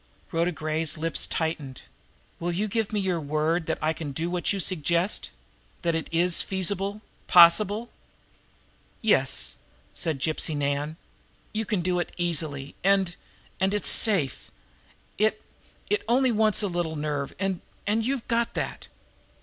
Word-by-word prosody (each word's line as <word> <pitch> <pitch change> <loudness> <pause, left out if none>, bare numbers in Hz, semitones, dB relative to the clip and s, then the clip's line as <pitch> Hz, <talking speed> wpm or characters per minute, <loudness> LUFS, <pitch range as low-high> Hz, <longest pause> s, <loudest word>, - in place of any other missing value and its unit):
Rhoda 170 +1 +1
Gray's 155 0 -2
lips 165 +1 -1
tightened, 155 -5 -3 0.6
"Will 175 +1 -1
you 200 +5 -1
give 220 0 -1
me 210 - 0
your 185 -3 0
word 155 +3 0
that - - 0
I 155 +1 +2
can 150 -3 -6
do 165 +5 -2
what 180 -1 +1
you 200 - -1
suggest 170 - +1 0.5
that 170 -1 +2
it 160 0 -2
is 170 +1 +3
feasible, 195 +2 -1 0.2
possible?" 205 +7 +6 1.1
"Yes," 130 - +2 0.4
said 160 -4 -2
Gypsy 155 +2 -1
Nan. 145 +2 -1 0.6
"You 220 +1 -1
can 210 -5 0
do 180 0 0
it 175 - -3
easily, 155 -5 -2
and 195 -2 +3 0.4
and 190 +2 +2
it's 210 - 0
safe. 190 - +2 0.7
It 215 +1 +2 0.5
it 415 - +1
only 255 +2 +3
wants 215 -1 +3
a - - +1
little 175 -3 -2
nerve, 145 -2 -3
and 190 -1 -2 0.2
and 220 +2 +1
you've 260 0 -2
got 235 -1 0
that." - - -4
175 Hz, 145 wpm, -26 LUFS, 155-205 Hz, 1.1 s, possible